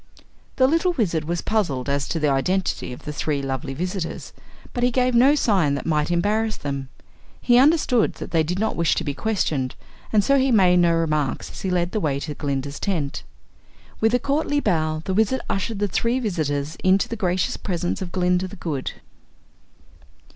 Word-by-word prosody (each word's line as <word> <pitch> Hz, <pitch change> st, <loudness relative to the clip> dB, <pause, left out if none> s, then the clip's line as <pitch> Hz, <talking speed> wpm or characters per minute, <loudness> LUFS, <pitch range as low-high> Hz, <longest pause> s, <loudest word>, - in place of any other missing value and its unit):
The 260 Hz, -, +4 dB
little 330 Hz, +6 st, +2 dB
Wizard 170 Hz, -, 0 dB
was 170 Hz, +1 st, -2 dB
puzzled 165 Hz, -, -1 dB
as 140 Hz, 0 st, 0 dB
to 165 Hz, -, -2 dB
the 150 Hz, -, +1 dB
identity 145 Hz, +4 st, 0 dB
of 125 Hz, -, -9 dB
the 150 Hz, -, -4 dB
three 145 Hz, 0 st, -1 dB
lovely 135 Hz, +1 st, -3 dB
visitors 180 Hz, +1 st, -4 dB, 0.4 s
but 245 Hz, -, -3 dB
he 245 Hz, -, +4 dB
gave 255 Hz, 0 st, +1 dB
no 260 Hz, +5 st, +5 dB
sign 190 Hz, -, +2 dB
that -, -, -5 dB
might 155 Hz, -1 st, +1 dB
embarrass 210 Hz, +5 st, 0 dB
them. 140 Hz, -2 st, -4 dB, 0.5 s
He 245 Hz, 0 st, +4 dB
understood 270 Hz, -5 st, +3 dB
they 165 Hz, -, -1 dB
did 170 Hz, +4 st, -2 dB
not 220 Hz, +2 st, 0 dB
wish 170 Hz, -1 st, +2 dB
to -, -, -1 dB
be 145 Hz, -3 st, -2 dB
questioned, 150 Hz, -9 st, -1 dB, 0.4 s
and 210 Hz, -2 st, +4 dB
so 275 Hz, +3 st, +3 dB
he 265 Hz, +1 st, +2 dB
made 185 Hz, -5 st, +5 dB
no 175 Hz, -1 st, +4 dB
remarks 155 Hz, -4 st, -1 dB
as -, -, -9 dB
he 190 Hz, -, -2 dB
led 175 Hz, -1 st, 0 dB
the 215 Hz, -, -1 dB
way 145 Hz, -7 st, 0 dB
to 150 Hz, -, -4 dB
Glinda's 140 Hz, -1 st, -3 dB
tent. 160 Hz, -9 st, -2 dB, 0.8 s
With 225 Hz, +2 st, +3 dB
a -, -, +2 dB
courtly 290 Hz, +2 st, 0 dB
bow 155 Hz, -, 0 dB
the 190 Hz, -, -1 dB
Wizard 220 Hz, +6 st, +2 dB
ushered 200 Hz, +3 st, -2 dB
the 205 Hz, +1 st, 0 dB
three 230 Hz, +5 st, 0 dB
visitors 155 Hz, -, -2 dB
into 190 Hz, +1 st, +3 dB
the 230 Hz, -, -4 dB
gracious 185 Hz, -4 st, 0 dB
presence 175 Hz, -2 st, -3 dB
of 180 Hz, -2 st, -5 dB
Glinda, 180 Hz, 0 st, +1 dB
the -, -, -10 dB
Good. 150 Hz, -7 st, -4 dB
180 Hz, 190 wpm, -23 LUFS, 150-220 Hz, 0.8 s, no